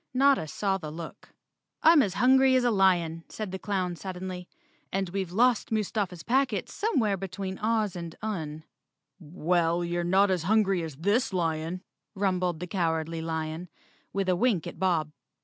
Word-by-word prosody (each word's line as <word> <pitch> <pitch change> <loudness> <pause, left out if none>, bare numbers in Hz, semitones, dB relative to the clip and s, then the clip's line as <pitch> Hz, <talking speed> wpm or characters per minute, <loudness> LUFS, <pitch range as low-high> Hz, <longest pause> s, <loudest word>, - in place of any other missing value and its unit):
Notta 270 - +4
saw 195 +5 -1
the 155 - -6
look. 165 +1 -9 0.5
"I'm 320 -2 +7
hungry 260 +5 +4
as 255 - +3
a 240 - +3
lion," 175 -5 +2
said 215 -4 -5
the 190 - -5
clown 185 -4 -2
suddenly, 180 0 -6 0.4
"and 195 -1 -1
we've 190 -1 -3
lost 235 +4 +2
Mustafa's 200 -5 -1
packets 250 -5 0
somewhere 240 - +1
between 190 0 -5
Oz 215 -3 0
and 170 -2 -6
Un. 160 -8 -4 0.6
"Well, 170 +1 0
you're 175 0 -1
not 190 +3 +3
as 180 -3 +1
hungry 195 0 +2
as 160 -4 -6
this 205 - +1
lion," 165 +1 -1 0.3
rumbled 185 -4 0
the - - -2
Cowardly 165 -2 -1
Lion, 160 +1 -4 0.4
with 195 -1 -1
a 185 - +3
wink 195 -4 +1
at - - -8
Bob. 170 -5 +1
185 Hz, 155 wpm, -28 LUFS, 170-210 Hz, 0.6 s, I'm